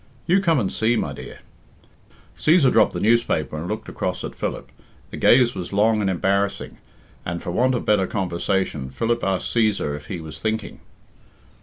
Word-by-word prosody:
You 190 +3 +3
come 165 -6 +2
and 100 -5 -1
see, 115 +2 +2
my - - -2
dear." - - -10 0.9
Cæsar 155 -5 +4
dropped 110 -2 +4
the - - -3
newspaper 110 -9 +1
and 80 +3 -5
looked 110 +3 -4
across - - -3
at - - -5
Philip. - - -5 0.4
The - - -7
gaze 120 -1 +5
was 90 -3 -6
long 105 +2 +3
and 100 - +1
embarrassing, 100 +2 -1 0.4
and, 85 0 -4
for 90 - -5
want 125 +7 +2
of 120 - -3
better 105 -3 +2
conversation, 90 -6 -2
Philip 115 - -1
asked 95 -1 -1
Cæsar 105 -10 +1
if 75 0 -10
he 90 - -5
was 80 -1 -8
thinking. 110 0 -3
105 Hz, 175 wpm, -22 LUFS, 90-115 Hz, 0.9 s, gaze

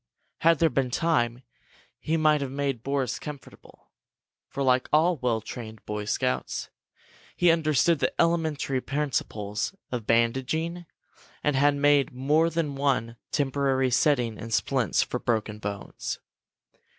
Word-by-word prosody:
Had 165 0 +4
there 165 -1 +3
been 135 -2 0
time, 125 -4 0 0.6
he 160 +1 0
might 155 -2 +3
have 140 - -2
made 135 -3 -2
Boris 135 -2 -1
comfortable, 150 -3 -11 0.6
for, 140 - -3
like 130 -1 +2
all 165 +3 +4
well 120 -4 0
trained 110 -1 -9
Boy 105 0 -4
Scouts, 65 -10 -2 0.6
he 175 -1 +5
understood 160 0 +2
the - - +1
elementary 160 -6 +1
principles 125 - -2 0.2
of 120 -4 -4
bandaging 130 +9 0 0.6
and 150 -2 +1
had 145 +2 +4
made 145 -2 +3
more 150 +6 +2
than 160 -3 -1
one 135 -5 0 0.2
temporary 135 -2 +1
setting 125 -4 +2
in 115 - -7
splints 120 -2 +1
for - - -4
broken 110 -2 -1
bones. 100 -1 -5
135 Hz, 130 wpm, -26 LUFS, 120-150 Hz, 0.6 s, he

